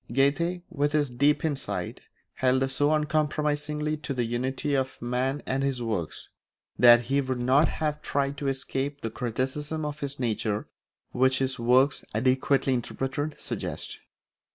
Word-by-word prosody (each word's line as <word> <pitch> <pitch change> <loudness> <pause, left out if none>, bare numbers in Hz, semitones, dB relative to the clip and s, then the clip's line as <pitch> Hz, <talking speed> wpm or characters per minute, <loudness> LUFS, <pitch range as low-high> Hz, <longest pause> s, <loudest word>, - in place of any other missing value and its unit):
Goethe, 170 +7 +1
with 145 0 0
his 145 -4 +1
deep 140 +6 +2
insight, 145 -4 -3 0.3
held 130 +1 +2
so 145 +2 +2
uncompromisingly 150 0 0
to 150 -2 -4
the 125 - +1
unity 130 +5 -2
of 135 -1 -1
man 125 +4 -1
and 135 +1 0
his 135 -3 0
works, 105 -9 -3 0.5
that 120 -1 +8
he 135 +4 +1
would 130 -2 -2
not 135 +5 +4
have 150 -1 -2
tried 140 0 -1
to 140 - -2
escape 135 +1 -2
the 115 - -3
criticism 135 +6 -2
of 150 0 -4
his 140 -1 -4
nature 110 -3 -1 0.4
which 130 +1 +3
his 135 -1 -1
works, 130 +4 +3
adequately 130 +3 +2
interpreted, 135 +4 -3
suggest. - - -4
135 Hz, 145 wpm, -27 LUFS, 125-145 Hz, 0.5 s, that